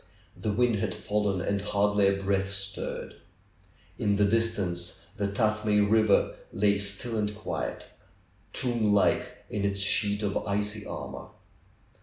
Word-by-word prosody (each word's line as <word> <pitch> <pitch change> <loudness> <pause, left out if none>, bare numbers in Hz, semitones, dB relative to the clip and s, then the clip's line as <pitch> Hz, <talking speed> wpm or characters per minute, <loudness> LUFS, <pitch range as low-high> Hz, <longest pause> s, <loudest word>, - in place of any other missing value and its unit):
The 105 - -2
wind 120 +1 +2
had 100 -2 -1
fallen 105 -3 -1
and 100 +1 -1
hardly 105 0 +2
a 100 0 +1
breath 95 0 0
stirred. 100 0 -4 0.8
In 100 -1 +2
the 105 0 +3
distance 100 -5 -1
the 100 - 0
Tuthmay 105 0 +1
River 105 0 +3
lay 100 0 +2
still 100 +4 0
and 105 -1 -1
quiet; 105 - -4 0.7
tomb 115 -5 +1
like 100 - +1
in 100 - -2
its 100 0 0
sheet 100 +1 +2
of 100 -1 0
icy 105 +1 -2
armor. - - -6
105 Hz, 135 wpm, -28 LUFS, 100-105 Hz, 0.8 s, the